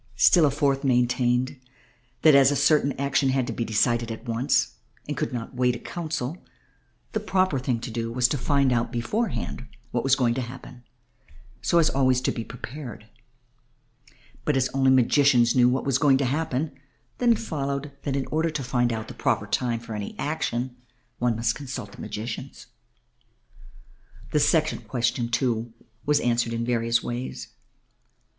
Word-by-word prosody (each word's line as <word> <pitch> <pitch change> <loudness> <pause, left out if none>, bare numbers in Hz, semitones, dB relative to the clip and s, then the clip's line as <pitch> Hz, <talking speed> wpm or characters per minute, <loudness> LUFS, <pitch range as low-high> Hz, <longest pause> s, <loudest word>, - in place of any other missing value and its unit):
Still 150 +7 +6
a - - +3
fourth 140 -1 0
maintained 125 0 +1 0.6
that 155 - +7
as 140 0 +5
certain 145 -1 +4
action 140 0 +1
had 130 -1 +1
to - - -4
be 115 - -2
decided 115 +1 +1
at 110 - -8
once 120 +1 0 0.3
and 145 - -3
could - - -2
not 120 +1 -5
wait 125 -1 +1
a - - -7
council 165 -2 -4 0.7
the 220 - -1
proper 185 -8 +1
thing 125 -2 -1
to 120 - -6
do 115 0 -3
was 125 +1 +3
to 145 - 0
find 140 -1 +2
out 120 -1 0
beforehand 125 - -2 0.2
what 120 - -1
was 135 -1 +4
going 120 -4 +2
to 130 - -2
happen 125 0 -9 0.8
so 170 - +2
as 165 - +5
to - - -5
be - - -7
always 130 -2 +3
prepared. 120 -1 -5 1.3
But 150 -3 +1
as 130 -1 +1
only 135 -1 +2
magicians 130 -1 +4
knew 125 -1 +5
what 130 +1 -1
was 135 -1 +2
going 140 -2 +5
to 135 - 0
happen, 145 +1 -1 0.5
then 240 -1 +5
it - - -2
followed 140 -7 -3
that 135 - -2
in 135 -1 -1
order 160 +2 +1
to 150 -3 -4
find 120 -1 +1
out 110 -1 -4
the - - -8
proper - - 0
time 120 -2 -1
for 115 -1 -8
any 105 -1 -5
action 125 -4 -2 0.4
one 120 -1 +1
must 115 0 +1
consult 130 -6 -7
the - - -11
magicians. 115 +4 -6 1.7
The 150 - +2
second 155 +1 +1
question, 120 -1 0
too, 115 -2 -1 0.3
was 150 0 +4
answered 120 -1 +1
in 115 0 -2
various 115 -1 +1
ways. 120 +2 -5
130 Hz, 170 wpm, -25 LUFS, 120-140 Hz, 1.7 s, that